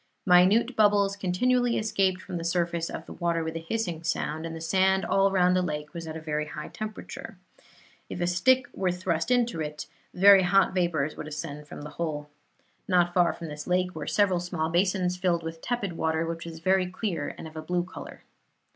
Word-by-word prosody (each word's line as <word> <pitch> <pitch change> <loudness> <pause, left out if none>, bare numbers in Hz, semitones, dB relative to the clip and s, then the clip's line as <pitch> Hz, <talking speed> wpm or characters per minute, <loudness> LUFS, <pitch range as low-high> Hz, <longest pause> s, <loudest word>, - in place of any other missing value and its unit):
Minute 195 +7 +5
bubbles 205 -2 +3
continually 240 +6 +1
escaped 190 -4 0
from 185 -2 -5
the 165 - -5
surface 170 -1 -1
of 160 - -6
the - - -9
water 170 -1 -1
with 160 0 -4
a - - -2
hissing 170 -1 -3
sound, 160 -1 -2
and 165 - -6
the - - -6
sand 190 +3 +2
all 195 0 +3
round 180 -1 +3
the 185 - +3
lake 150 -3 -4
was 165 -1 -6
at 160 0 -5
a 150 -1 -2
high 150 - -7
temperature. 215 0 -7 0.7
If - - -6
a 175 - +1
stick 245 +9 +3
was 180 -2 -1
thrust 170 0 -1
into 240 -8 +1
it, 150 0 -5 0.3
very 195 +1 +7
hot 190 +1 +3
vapors 165 -5 0
would 150 - -7
ascend 150 -1 -6
from 145 - -9
the 150 - -8
hole. 150 -3 -3 0.6
Not 175 -2 +3
far 175 -1 +4
from 170 -1 -8
this 150 0 -7
lake 180 0 +1
were 155 -2 -6
several 195 -4 +2
small 175 -2 -2
basins 180 0 +1
filled 175 -2 0
with 165 0 -6
tepid 235 -7 -2
water, 160 0 0
which 165 0 -5
was 165 -1 -7
very 185 +1 +2
clear, 180 -5 -3
and - - -8
of 160 - -13
a 155 - -4
blue 175 +2 -1
color. 185 - -10
175 Hz, 200 wpm, -27 LUFS, 160-190 Hz, 0.7 s, very